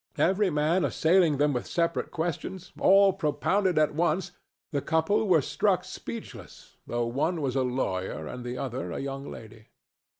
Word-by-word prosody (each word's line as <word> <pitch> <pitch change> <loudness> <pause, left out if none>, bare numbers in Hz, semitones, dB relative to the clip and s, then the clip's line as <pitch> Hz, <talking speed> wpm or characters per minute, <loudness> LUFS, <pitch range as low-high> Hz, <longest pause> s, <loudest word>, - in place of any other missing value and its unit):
Every 190 +2 +3
man 160 +3 +1
assailing 160 +1 +3
them 145 +1 +2
with 125 - -3
separate 170 -1 -1
questions, 175 +2 -4
all 195 0 +6
propounded 185 +2 0
at 155 -1 +3
once, 175 +3 0 0.4
the 140 -3 -1
couple 170 +9 +1
were 165 -6 +4
struck - - +1
speechless, - - -9
though 120 0 -1
one 150 +9 -1
was 135 -3 -2
a 135 - +2
lawyer 95 -10 -2
and 125 +10 -7
the 125 +1 -5
other 130 -1 -4
a - - -4
young 135 0 -5
lady. 110 -1 -11
155 Hz, 160 wpm, -27 LUFS, 130-180 Hz, 0.4 s, all